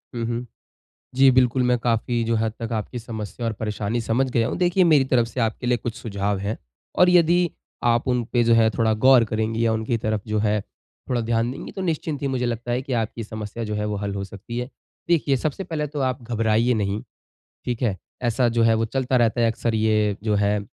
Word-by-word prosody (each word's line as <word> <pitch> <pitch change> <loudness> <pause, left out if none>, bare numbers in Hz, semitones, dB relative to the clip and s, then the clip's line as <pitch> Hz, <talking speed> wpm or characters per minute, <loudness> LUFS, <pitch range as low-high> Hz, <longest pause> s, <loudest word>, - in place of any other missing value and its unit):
हुँ, 115 -1 -2
हुँ। 120 +1 -3 0.7
जी, 135 +1 +6
बिल्कुल, 125 0 +3
मैं 125 0 +3
काफ़ी 115 0 0
जो 115 0 0
हद 110 -1 0
तक 115 - -4
आपकी 110 +3 -3
समस्या 110 0 -6
और 115 - -1
परेशानी 105 +1 -2
समझ 125 +4 0
गया 115 -2 +2
हूँ, - - -3
देखिए 180 +1 +3
मेरी 155 -6 +5
तरफ़ 120 -2 +3
से 120 - -6
आपके 115 +2 -1
लिए 120 0 +3
कुछ 115 0 -5
सुझाव 100 -4 -2
हैं, 100 +3 -3 0.4
और 180 - +5
यदि 175 0 +4 0.3
आप 120 +1 +2
उन 125 -1 +1
पे 120 -1 +4
जो 115 0 +4
है 115 -1 +5
थोड़ा 110 -2 +3
गौर 130 -3 +7
करेंगी 110 +1 -1
या 115 - +2
उनकी 110 +1 -1
तरफ़ 110 -1 -1
जो 105 0 0
है 105 0 +1 0.5
थोड़ा 125 -2 +1
ध्यान 115 +1 0
देंगी 130 - -8
तो 190 - -6
निश्चिंत 160 -4 -2
ही 140 - 0
मुझे 130 -2 -1
लगता 120 0 -3
है 125 +1 0
कि 130 0 -4
आपकी 115 +1 -5
समस्या 110 +1 -6
जो 105 -1 -4
है 105 0 -1
वो 105 0 -2
हल 100 -1 -2
हो 100 - -3
सकती 100 +4 -8
है। 125 +1 -3 0.4
देखिए 150 -5 +3
सबसे 155 +8 -3
पहले 160 -4 -3
तो 145 0 -6
आप 130 -1 -1
घबराइए 115 +1 +1
नहीं, 105 -1 -1 0.6
ठीक 120 -2 -3
है? 105 -7 0 0.3
ऐसा 120 +1 +2
जो 115 0 +1
है 115 0 +5
वो 115 0 +1
चलता 130 +2 0
रहता 120 0 +2
है 115 - +4
अक्सर 115 0 -2
ये 105 -2 +2
जो 105 -1 +1
है, 105 0 +2
115 Hz, 230 wpm, -23 LUFS, 110-125 Hz, 0.7 s, गौर